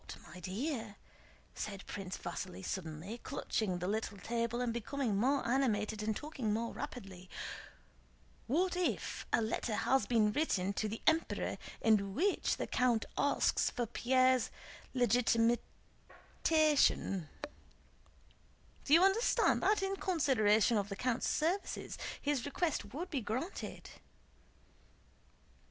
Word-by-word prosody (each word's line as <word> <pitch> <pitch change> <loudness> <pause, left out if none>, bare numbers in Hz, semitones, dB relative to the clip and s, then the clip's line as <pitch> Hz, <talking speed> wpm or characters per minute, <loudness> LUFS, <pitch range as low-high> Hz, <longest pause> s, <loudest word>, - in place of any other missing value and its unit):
"But, - - -7 0.2
my 180 - -9
dear," 220 - -3 0.6
said 200 -2 -5
Prince 190 -2 -5
Vasíli 185 0 -6
suddenly, 180 +6 -5
clutching 215 -8 -2
the 180 +1 -3
little 215 0 -2
table 235 +2 -2
and 245 -2 0
becoming 235 -1 -1
more 260 +6 +2
animated 220 -5 +1
and 215 0 -1
talking 275 -8 -3
more 230 +2 -1
rapidly: 195 -9 -7 1.2
"what 355 +9 +1
if 360 -1 -2
a 230 - +3
letter 220 0 -1
has 265 +4 +2
been 220 -3 +3
written 200 -8 0
to 215 +2 -1
the 220 - -6
Emperor 320 +1 +1 0.2
in 200 -3 +3
which 385 +5 +1
the - - -2
count 245 -3 +1
asks 285 - +2
for 240 - -2
Pierre's 255 +2 +3 0.5
legitimation? 240 - +1 1.5
Do 295 - +5
you 340 - +6
understand 390 +5 +3
that 415 -1 +3
in 390 0 -1
consideration 240 - +3
of 200 0 -3
the 200 - -4
count's 245 +3 0
services, 345 +6 -1 0.2
his 285 -4 0
request 315 +2 -1
would 335 +7 -5
be 280 -5 -1
granted?..." 255 - -4
235 Hz, 120 wpm, -34 LUFS, 210-285 Hz, 1.5 s, you